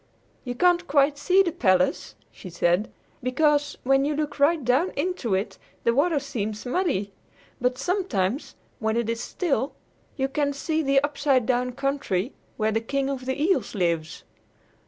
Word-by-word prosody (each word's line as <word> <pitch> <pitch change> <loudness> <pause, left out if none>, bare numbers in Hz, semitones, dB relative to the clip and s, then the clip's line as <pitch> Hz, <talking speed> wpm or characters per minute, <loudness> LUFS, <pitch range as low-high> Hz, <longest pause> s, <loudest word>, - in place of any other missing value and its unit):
"You 245 -1 -4
can't 355 +4 +3
quite 285 0 +3
see 375 +5 +4
the 345 - -1
palace," 185 - +1 0.2
she 185 - -10
said, 175 +4 +1 0.3
"because, 290 +3 +1
when 270 +1 +3
you 295 +1 0
look 300 -1 -3
right 295 -1 +3
down 265 +9 +3
into 290 - -1
it, 195 +3 -3 0.2
the 235 - +3
water 295 +4 +2
seems 220 -6 -4
muddy. 245 - -1 0.5
But 250 0 +1
sometimes, 275 - -1 0.2
when 220 -1 0
it 235 -1 0
is 230 0 -3
still, 290 -6 -1 0.4
you 270 -1 +1
can 285 +1 0
see 315 +3 -1
the 275 -2 +3
Upside 285 -4 +1
Down 250 0 0
Country 275 -6 -1 0.2
where 220 0 +1
the 225 +1 0
King 275 +3 -1
of 260 -2 -5
the 265 +2 -2
Eels 335 - +1
lives. 170 -4 -1
270 Hz, 160 wpm, -25 LUFS, 230-295 Hz, 0.5 s, see